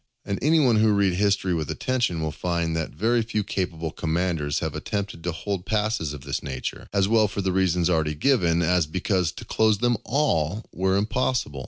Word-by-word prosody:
And 100 - -2
any 160 +3 +4
who 110 -7 +4
read 100 -2 +2
history 95 -1 +1
with 80 -4 -2
attention 120 -10 -1
will 80 - -1
find, 85 +1 -2
that 80 -1 -2
very 115 +2 +1
few 110 -2 -2
capable 85 -5 -3
commanders 80 -3 -1
have - - -2
attempted 100 -5 -4
to 90 - -1
hold 90 +2 -4
passes 110 -7 0
of 75 -2 -7
this 70 +1 -3
nature, 65 -1 -5
as 100 -1 +2
well 110 0 +4
for 100 +1 -4
the 95 - +1
reasons 90 -2 +2
already 80 -4 +1
given, 85 - +2
as 90 -1 +2
because 90 0 0
to - - -9
close 110 -1 +2
them 120 +2 +1
all 110 - 0
were 95 +2 +1
impossible. 110 - -1
95 Hz, 190 wpm, -25 LUFS, 80-110 Hz, -, any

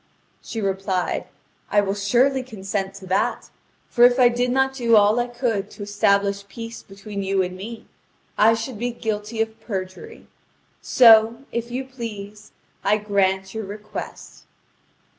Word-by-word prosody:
She 225 - -6
replied: 190 -2 -1 0.4
"I 205 - +3
will 195 -1 -1
surely 245 +7 +2
consent 195 -5 -4
to 195 -1 -10
that; 185 +2 -1 0.4
for 240 - +2
if 245 0 +7
I 245 -1 +7
did 245 +1 0
not 265 +1 +2
do 235 -3 +3
all 210 +2 +5
I 240 - 0
could 235 -5 -2
to 205 - -9
establish 200 -1 +1
peace 230 +1 -8
between 200 +1 -8
you 195 -1 +1
and 180 0 -5
me, 220 +4 -8 0.5
I 225 +1 +5
should 225 0 -5
be 245 +1 -1
guilty 220 -1 -2
of 225 0 -11
perjury. 200 - -6 0.6
So, 230 0 +6
if 235 0 -3
you 255 +2 -4
please, 215 -5 -8 0.3
I 210 +1 +3
grant 190 -2 0
your 220 -1 -4
request." 210 +2 -8
215 Hz, 150 wpm, -22 LUFS, 200-235 Hz, 0.6 s, if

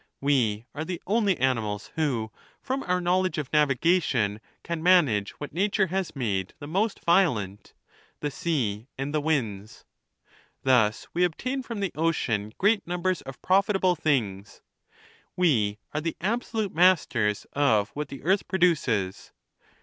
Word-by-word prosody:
We 120 -6 +1
are 155 - -4
the 175 +1 -4
only 205 -2 +2
animals 115 -6 -1
who, 125 -9 -1 0.3
from 270 0 -3
our 180 0 +2
knowledge 180 -1 +1
of 150 -2 -4
navigation, 140 - +2 0.2
can 170 -2 -4
manage 150 - +4
what 145 - -8
nature 200 +3 +2
has 190 -5 -2
made 100 -8 -2
the - - -9
most 195 +8 -1
violent 125 - +1 0.2
— - - -32
the 145 - -3
sea 120 -10 -2
and 135 +2 -3
the 155 - +1
winds. 110 -10 -2 0.8
Thus 120 -5 +2
we 175 - +2
obtain 255 +10 -1
from 230 -5 -6
the 195 -4 -1
ocean 125 -10 -1
great 205 0 +2
numbers 180 0 -1
of 135 -1 -11
prof 190 +1 +3
itable 190 -3 +2
things. 110 - -2 0.7
We 115 - +2 0.2
are 150 - -1
the 165 +1 -3
absolute 220 +1 -2
masters 150 - +3
of 115 -8 +2
what 150 +1 -5
the 135 - -10
earth 190 +5 +1
produces. 135 - 0
150 Hz, 145 wpm, -26 LUFS, 115-185 Hz, 0.8 s, manage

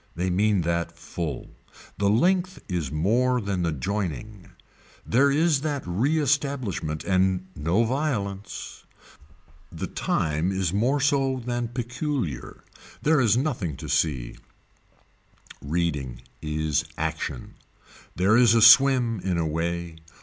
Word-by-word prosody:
They 90 +2 -1
mean 100 +1 +2
that 85 0 -2
full. 85 -2 -5 0.5
The 100 0 +2
length 180 - +2
is 85 -8 -3
more 120 +11 +2
than 100 -4 -2
the 85 -1 0
joining. 100 +5 -4 0.6
There 135 +5 +3
is 150 0 +2
that 145 -3 -2
reestablishment 130 - 0
and 95 -1 +1
no 85 +10 +1
violence. 110 -7 -3 0.9
The - - -5
time 80 +4 -1
is 95 -2 -1
more 125 +8 +1
so 135 -2 +1
than 120 -1 -2
peculiar. 120 - -4 0.4
There 150 -2 +4
is 115 -1 +3
nothing 115 - -2
to - - -8
see. 65 -7 -1 1.2
Reading 70 -6 -2 0.2
is 75 -1 -1
action. - - -4 0.6
There 95 +5 +3
is 120 -2 +5
a 115 - +4
swim 120 -1 +6
in 90 -2 -1
a 85 - 0
way. 85 +1 -3
100 Hz, 120 wpm, -25 LUFS, 85-130 Hz, 1.2 s, swim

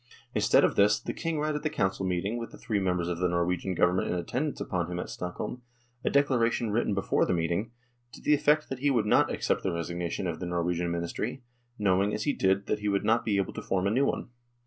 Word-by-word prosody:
Instead - - +4
of - - +3
this, 105 +1 +4
the - - -5
King 165 -2 -2
read 155 +1 0
at 150 - -2
the 155 - 0
council 95 -6 -1
meeting, 95 +6 -1
with 115 - -5
the - - -13
three 105 -3 -1
members 90 -3 0
of 85 -1 -2
the 90 0 +2
Norwegian 85 +1 0
Government 90 +2 +2
in - - -1
attendance 125 - -2
upon 90 -2 -2
him 90 - -3
at - - -5
Stockholm, 90 +7 -5 0.4
a - - +1
declaration 120 -5 +2
written 105 -2 +1
before 100 - +1
the 90 - +1
meeting, 85 +6 -1 0.4
to - - -10
the 150 - +2
effect 150 +1 +3
that 135 - -4
he 145 +2 +2
would 120 -6 +2
not 105 - +4
accept - - 0
the 95 - -1
resignation 85 +2 -3
of 85 -2 -3
the 90 - -4
Norwegian 85 0 -1
Ministry, 85 +9 -3 0.3
knowing, 100 0 +2
as 105 - -3
he 145 - +1
did, 95 +1 +1
that 105 - -1
he 105 0 -1
would 100 -1 0
not 110 - +3
be 105 -3 +1
able 95 - -1
to - - -5
form 95 -1 -1
a 100 - +2
new 135 +5 +3
one. - - -2
100 Hz, 240 wpm, -28 LUFS, 90-120 Hz, 0.4 s, Instead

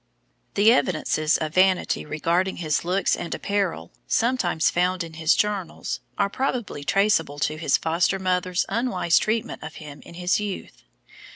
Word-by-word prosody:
The 215 +3 +6
evidences 155 -7 +1
of 155 -1 -4
vanity 185 -4 +2
regarding 170 +5 0
his 155 -4 -1
looks 185 +3 +1
and 170 - -4
apparel, 195 - -2 0.2
sometimes 225 -10 +1
found 180 0 +1
in 165 -1 -9
his 160 +1 +2
journal, 205 -4 -2 0.3
are 200 - +2
probably 240 - -3
traceable 160 -2 +2
to 150 +2 -1
his 155 -3 +2
foster 170 +4 +1
mother's 185 -1 0
unwise 230 -6 +1
treatment 220 +1 -2
of - - -8
him 150 -3 -10
in 170 - -13
his 180 +2 +1
youth. 205 -2 -6
180 Hz, 150 wpm, -24 LUFS, 160-200 Hz, 0.3 s, The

